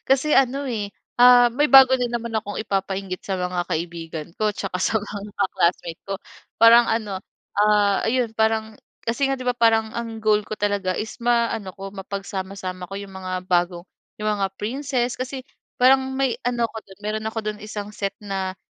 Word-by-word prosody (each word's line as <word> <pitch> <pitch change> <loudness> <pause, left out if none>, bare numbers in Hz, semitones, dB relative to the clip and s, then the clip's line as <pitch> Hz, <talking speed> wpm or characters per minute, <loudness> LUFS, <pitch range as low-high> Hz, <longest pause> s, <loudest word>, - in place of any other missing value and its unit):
Kasi 270 +3 +3
ano, 270 +1 +2
eh, 210 -4 -3 0.3
uhm, 245 -1 +7
may 295 +1 +3
bago 260 -1 +9
na 250 - -1
naman 235 -1 -3
akong 205 -1 -3
ipapa-inggit 195 -2 -3
sa 195 - -3
mga 180 -1 -1
kaibigan 165 -2 -4
ko, 215 -1 +1
tsaka 195 -2 -4
sa 210 +4 +1
mga 205 0 -7
ka-classmate 175 -3 0
ko. 195 - -3 0.5
Parang 235 +1 +8
ano, 215 -4 -1 0.4
ah, 205 -1 +3
ayun, 240 0 +1
parang 220 0 +1 0.3
kasi 235 +5 +1
nga, 270 - -1
'di 255 - -7
ba, 250 - +2
parang 225 -1 +3
ang 230 -1 -4
goal 210 -1 +3
ko - - -9
talaga 200 -2 0
is 220 - -5
ma-ano 230 -5 +1
ko, 195 0 -8
mapagsama-sama 190 -1 -5
ko - - -6
'yong 195 -1 -9
mga 185 -1 -6 0.2
bago 175 0 0 0.3
yung 215 0 -1
mga 195 - +1
princess 250 +2 -1
kasi 260 +1 -5 0.3
parang 260 +2 +6 0.2
may 265 -2 0
ano 240 -1 0
ako 225 - -4
dun, 190 - -15
meron 215 +1 -2
ako 220 - -5
dun 210 0 -4
isang 210 0 -6
set 200 -1 -3
na 190 -1 -3
210 Hz, 180 wpm, -23 LUFS, 195-235 Hz, 0.5 s, bago